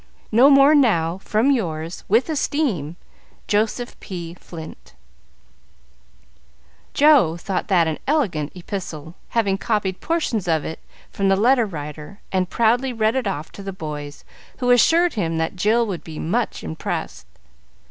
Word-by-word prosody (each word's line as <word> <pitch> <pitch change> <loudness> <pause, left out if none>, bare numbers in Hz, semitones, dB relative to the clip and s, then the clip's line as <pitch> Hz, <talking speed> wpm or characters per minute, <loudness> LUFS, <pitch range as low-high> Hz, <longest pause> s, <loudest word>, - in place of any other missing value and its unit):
No 245 +6 +6
more 275 +1 +7
now, 190 - +2
from 220 +7 +1
yours, 165 - -2
with 225 +5 +3
esteem, 275 - -1 0.5
"Joseph 220 +3 -1
P. 170 -3 -7
Flint" 160 - -11 2.0
Joe 275 - +5
thought 185 +2 -3
that 175 -4 +3
an 160 -1 -2
elegant 195 - 0
epistle, 170 -4 -6 0.2
having 200 -4 0
copied 200 -4 -1
portions 300 - -1
of 160 -2 +1
it 160 - -5 0.3
from 195 -1 0
the 195 - +4
"Letter 235 +3 +3
Writer," 150 +2 -8
and 185 -1 0
proudly 240 +3 +2
read 220 -2 +1
it 260 -5 -1
off 160 -5 -4
to - - -10
the 195 0 -5
boys, 150 -5 -7 0.3
who 250 -1 +1
assured 330 +8 +4
him 165 -7 -1
that 160 +3 -2
Jill 220 +5 +2
would 190 -6 -5
be 160 -2 -9
much 225 +9 -2
impressed. 65 -6 -5
195 Hz, 140 wpm, -21 LUFS, 160-240 Hz, 2.0 s, more